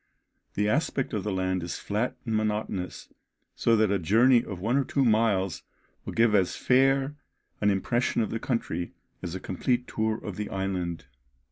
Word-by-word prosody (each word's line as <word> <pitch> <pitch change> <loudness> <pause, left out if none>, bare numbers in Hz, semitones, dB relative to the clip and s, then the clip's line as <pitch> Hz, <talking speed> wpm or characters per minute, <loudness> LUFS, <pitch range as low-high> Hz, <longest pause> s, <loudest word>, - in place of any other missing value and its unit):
The 105 +1 +1
aspect 135 +2 0
of 105 - -1
the 105 - -2
land 95 -1 0
is 85 0 -4
flat 105 +5 -2
and 115 -2 -1
monotonous, 105 -3 -2 0.4
so 115 - +3
that 110 -2 +3
a 100 - +2
journey 115 +8 +4
of 95 -4 -6
one 115 +7 0
or 140 - +3
two 135 0 +1
miles 105 -6 +2 0.4
will - - -5
give 115 -1 +3
as 95 -3 +2
fair 135 +2 +2 0.4
an 105 - +4
impression 115 +4 +1
of 110 - -4
the 115 - -2
country 90 -10 -2 0.3
as 90 0 -5
a - - -4
complete 120 +8 -1
tour 110 0 0
of 105 -5 -7
the 105 - -3
island. 90 -3 -3
105 Hz, 175 wpm, -27 LUFS, 95-120 Hz, 0.4 s, journey